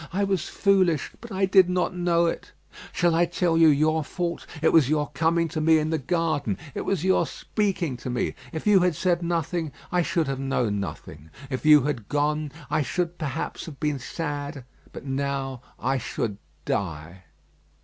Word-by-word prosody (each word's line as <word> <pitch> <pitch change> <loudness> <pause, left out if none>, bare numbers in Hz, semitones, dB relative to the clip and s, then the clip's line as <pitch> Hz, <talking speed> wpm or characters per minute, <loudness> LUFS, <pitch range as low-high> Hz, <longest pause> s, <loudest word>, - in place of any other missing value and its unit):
I 200 +3 0
was 195 -4 -1
foolish; 185 -7 +2
but 235 -1 -10
I 195 0 +1
did 190 -1 +5
not 180 0 0
know 175 -1 +2
it. 165 - -3 0.4
Shall 175 -1 +2
I 170 +1 +4
tell 175 0 0
you 165 0 +6
your 155 +1 +3
fault? 170 +2 -4
It 160 - +2
was 155 -5 +5
your 150 -1 +1
coming 165 +3 +1
to 155 0 -3
me 160 +1 +5
in 155 +1 0
the 160 - 0
garden; 155 - -1 0.2
it - - -4
was 190 -5 0
your 190 0 +3
speaking 185 - -2
to 125 - -6
me. 125 0 -1 0.2
If 160 - -5
you 205 -2 +6
had 180 -2 +2
said 175 +1 +1
nothing, 170 -1 -1 0.2
I 180 - +3
should 170 -1 0
have 135 -1 -2
known 125 -6 0
nothing. 80 -5 -7 0.2
If 130 +4 -2
you 150 -3 +8
had 130 -7 -3
gone, 150 0 0 0.2
I - - +1
should, 175 +5 -2
perhaps, 145 0 -4
have 145 -4 -9
been 150 -3 -1
sad, 145 -1 -5 0.3
but - - -9
now 135 -1 -2 0.2
I 135 +2 0
should 110 -3 -3 0.3
die. 90 0 -3
155 Hz, 185 wpm, -25 LUFS, 135-175 Hz, 0.4 s, you